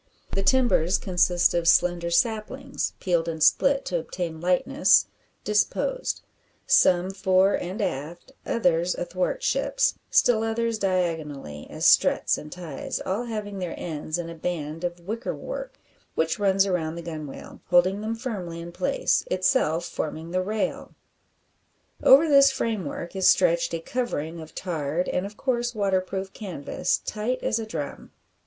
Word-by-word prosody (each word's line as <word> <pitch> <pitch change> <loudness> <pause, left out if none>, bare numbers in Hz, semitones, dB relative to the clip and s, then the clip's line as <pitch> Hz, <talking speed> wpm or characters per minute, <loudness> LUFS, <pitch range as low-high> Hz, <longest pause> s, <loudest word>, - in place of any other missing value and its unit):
The 195 - 0
timbers 195 -5 +3
consist 175 -1 +2
of 170 -1 0
slender 175 0 +3
saplings 230 +8 -1
peeled 170 -3 0
and 160 -2 -1
split 275 - +4
to 175 -2 -1
obtain 165 -1 -5
lightness 180 0 +3 0.4
disposed, - - 0 0.4
some 180 +1 +4
fore 190 0 +3
and 185 +5 -3
aft, 165 - -5
others 175 -5 +1
athwart 185 - -2
ships, - - +1 0.2
still 230 -3 +4
others 225 0 -1
diagonally, 160 - -2
as - - -4
struts - - +4
and 150 - -10
ties, 170 -6 -5
all 205 +6 -2
having 210 -4 -5
their 180 -2 -4
ends 155 -1 -4
in 175 -1 -4
a 170 - -7
band 165 -1 -4
of 175 0 -3
wickerwork, 380 - -5 0.4
which 160 +5 0
runs 195 -1 +3
round 165 -3 -1
the 170 - -6
gunwale, 155 -4 -8
holding 185 +3 +3
them 220 +1 -2
firmly 200 -9 -5
in 170 +1 -7
place, 180 +1 0
itself 185 - +1
forming 160 +2 -5
the 185 +1 +1
rail. 210 +3 -3 1.1
Over 285 +5 +7
this 275 -2 +7
framework 200 - -3
is 190 -1 +3
stretched 170 -2 +3
a - - -3
covering 165 -6 -3
of 160 -1 -11
tarred, 165 -1 -2
and, 185 +2 -1
of 210 +1 -13
course, 240 -2 -1
waterproof 190 -1 -1
canvas, 180 -10 -2
tight 230 +4 -2
as 220 - +1
a 220 - -5
drum. 150 -8 -6
185 Hz, 145 wpm, -25 LUFS, 170-220 Hz, 1.1 s, Over